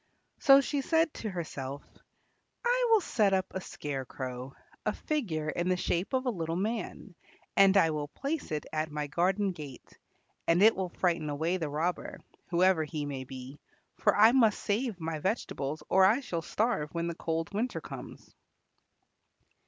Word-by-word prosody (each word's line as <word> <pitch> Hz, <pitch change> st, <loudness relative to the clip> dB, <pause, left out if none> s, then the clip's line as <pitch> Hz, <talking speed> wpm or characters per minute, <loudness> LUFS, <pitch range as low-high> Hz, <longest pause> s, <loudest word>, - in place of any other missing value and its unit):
So 275 Hz, 0 st, +7 dB
she 280 Hz, +1 st, -1 dB
said 325 Hz, +2 st, +2 dB
to 220 Hz, -, -5 dB
herself, 145 Hz, -6 st, -5 dB, 0.8 s
"I -, -, +3 dB
will 445 Hz, -2 st, +6 dB
set 210 Hz, -, +2 dB
up 190 Hz, -1 st, +2 dB
a 190 Hz, -, -4 dB
scarecrow, 130 Hz, -4 st, -6 dB, 0.3 s
a -, -, 0 dB
figure 185 Hz, -, -2 dB
in 175 Hz, +3 st, -1 dB
the 185 Hz, -, +2 dB
shape 180 Hz, +4 st, -1 dB
of 260 Hz, 0 st, +1 dB
a 250 Hz, -, +2 dB
little 165 Hz, -5 st, -3 dB
man, 210 Hz, 0 st, -3 dB, 0.4 s
and 195 Hz, 0 st, +6 dB
I 165 Hz, -4 st, +5 dB
will 150 Hz, -1 st, -3 dB
place 280 Hz, -, -4 dB
it 150 Hz, -1 st, -2 dB
at 155 Hz, 0 st, -1 dB
my 150 Hz, 0 st, -3 dB
garden 190 Hz, +6 st, +1 dB
gate, 145 Hz, -7 st, -11 dB, 0.5 s
and 170 Hz, +4 st, +4 dB
it 220 Hz, +1 st, +7 dB
will 185 Hz, -1 st, -2 dB
frighten 170 Hz, -3 st, 0 dB
away 160 Hz, +5 st, 0 dB
the 160 Hz, -4 st, -3 dB
robber, 160 Hz, +5 st, -2 dB, 0.3 s
whoever 180 Hz, -1 st, +3 dB
he 150 Hz, -1 st, -4 dB
may 135 Hz, -2 st, -5 dB
be, 130 Hz, +2 st, -9 dB, 0.4 s
for -, -, +3 dB
I 220 Hz, +2 st, +8 dB
must 230 Hz, -5 st, +4 dB
save 215 Hz, -1 st, -1 dB
my 160 Hz, -1 st, -3 dB
vegetables 155 Hz, -, -2 dB
or 190 Hz, -, +5 dB
I 210 Hz, +7 st, +5 dB
shall 170 Hz, -10 st, -3 dB
starve 205 Hz, -4 st, 0 dB
when 170 Hz, 0 st, -1 dB
the 170 Hz, -, -2 dB
cold 165 Hz, +2 st, -3 dB
winter 230 Hz, +5 st, -1 dB
comes." -, -, -10 dB
175 Hz, 170 wpm, -30 LUFS, 155-215 Hz, 0.8 s, I